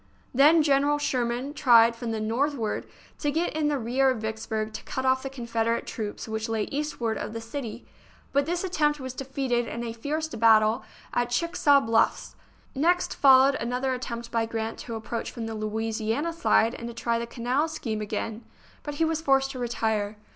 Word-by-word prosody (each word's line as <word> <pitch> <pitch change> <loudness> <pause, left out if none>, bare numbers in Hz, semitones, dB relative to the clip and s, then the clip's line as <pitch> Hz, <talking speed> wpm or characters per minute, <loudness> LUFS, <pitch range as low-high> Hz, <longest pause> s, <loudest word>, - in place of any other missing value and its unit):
Then 300 +5 +6
General 285 0 +3
Sherman 255 -1 -1
tried 235 -5 +5
from 235 0 -5
the 225 -1 -2
north 245 +7 0
ward 220 -5 -3 0.3
to 290 - 0
get 320 +2 -1
in 310 -1 +1
the 295 -1 +1
rear 260 +3 +2
of 255 - 0
Vicksburg 220 0 -3
to - - -7
cut 260 - -4
off 260 0 +3
the 270 - -5
Confederate 230 -3 -1
troops 215 -1 -5
which 220 0 -3
lay 220 -2 0
eastward 275 -6 -2
of - - -5
the 230 - -4
city; 230 0 -6 0.5
but 280 +1 +2
this 350 +2 -1
attempt 300 -5 +1
was 260 -1 -5
defeated 260 -3 -1
in 235 - -4
a 230 -1 -4
fierce 300 +7 -3
bat 225 -5 +5
tle 220 +4 0 0.3
at 245 0 +1
Chickasaw 290 +1 +3
Bluffs. 225 -1 +1 0.4
Next 345 +6 +2
followed 270 0 +6
another 250 +3 -1
attempt 235 -2 -5
by 230 -1 0
Grant 225 0 -4
to 230 - -6
approach 230 +1 -4
from 230 - -6
the 225 - -4
Louisiana 220 +7 -2
side 240 -8 +3
and 235 - -6
to 235 - -8
try 235 0 0
the 235 - -4
canal 250 +6 0
scheme 235 -9 -4
again, 215 +2 -4 0.4
but 295 -1 -6
he 325 - +2
was 320 0 -1
forced 270 -3 +2
to 260 - -7
retire. 220 -3 -1
240 Hz, 190 wpm, -26 LUFS, 225-280 Hz, 0.5 s, Then